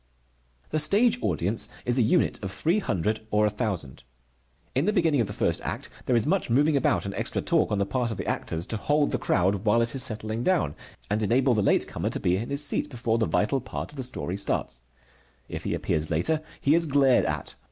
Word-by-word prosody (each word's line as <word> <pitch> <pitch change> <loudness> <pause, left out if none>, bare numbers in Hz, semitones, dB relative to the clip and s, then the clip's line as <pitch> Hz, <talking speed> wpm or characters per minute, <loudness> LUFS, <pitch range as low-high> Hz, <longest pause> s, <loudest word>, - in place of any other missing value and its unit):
The 155 - +1
stage 220 +9 +3
audience 100 +7 0 0.2
is 125 +1 +2
a - - +5
unit 110 - +2
of 95 - -3
three 165 - +1
hundred 110 - -1
or 105 0 +2
a 105 - +1
thousand. 100 - -3 0.7
In 135 +4 +1
the 210 - +2
beginning 165 - +2
of 110 - -1
the - - -6
first - - 0
act - - -5 0.2
there 125 - +3
is 115 - +2
much 180 0 0
moving 145 +6 +3
about 135 - +1
and 100 - -4
extra - - -1
talk - - +1
on 105 - +1
the 100 - +1
part 125 +2 -1
of 110 - -5
the - - -4
actors, 85 +1 -3
to 110 - -3
hold 145 +7 +1
the 125 - 0
crowd 95 0 +1
while 115 +2 +3
it 115 - -4
is 135 - +2
settling 110 0 -3
down, 165 - +1 0.4
and 105 +1 +1
enable 125 +4 +3
the 110 - +1
late - - +2
comer - - -3
to - - -4
be 90 - +1
in 115 +4 -4
his 140 +1 +3
seat - - +3
before 115 -2 -1
the 110 - +1
vital 130 +6 +1
part 130 - -6
of - - -15
the 135 - -4
story 95 - -2
starts. 65 -9 -2 0.7
If - - -7
he - - -1
appears 75 0 -1
later, 90 - 0 0.2
he 140 - +3
is 165 0 +3
glared 135 -3 +4
at. - - -3
115 Hz, 230 wpm, -26 LUFS, 105-145 Hz, 0.7 s, a